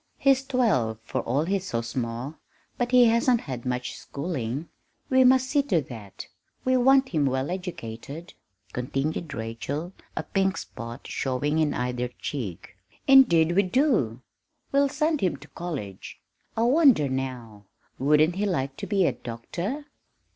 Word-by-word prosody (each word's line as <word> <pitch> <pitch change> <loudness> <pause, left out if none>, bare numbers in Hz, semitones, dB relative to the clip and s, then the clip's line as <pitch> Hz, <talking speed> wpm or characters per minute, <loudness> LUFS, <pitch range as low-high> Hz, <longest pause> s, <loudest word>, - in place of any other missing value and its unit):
"He's 270 -1 +3
twelve, 220 - +1
for - - -2
all 140 +6 0
he's 190 +1 -1
so 115 - -1
small, 120 +4 -4 0.4
but 245 0 -1
he 250 -1 +7
hasn't 235 +1 +3
had 125 -3 -6
much 125 0 -2
schooling. 140 -1 -4 0.4
We 260 0 +6
must 260 0 +5
see 285 +2 +3
to 205 - +1
that 115 -8 -8 0.4
we 255 0 +3
want 265 +1 +5
him 150 -4 +1
well 130 +4 -1
educated," 165 -3 -6 0.4
continued 135 +6 -2
Rachel, 130 +10 -4 0.2
a - - -1
pink 195 -1 0
spot 115 0 -8
showing 145 +4 -1
in 155 -2 +1
either 125 0 -1
cheek. 100 - -5 0.3
"Indeed 175 - +6
we 190 +3 +4
do 185 - +1 0.5
we'll 280 0 +3
send 305 +2 0
him 185 -3 +1
to - - -14
college! 140 - -6 0.4
I 225 - +2
wonder, 260 - +5
now, 125 -6 -5 0.3
wouldn't 150 +5 +3
he 205 +1 +1
like 135 -7 -2
to - - -5
be 195 -3 +2
a - - +3
doctor?" 170 - -5
155 Hz, 145 wpm, -26 LUFS, -, 0.5 s, he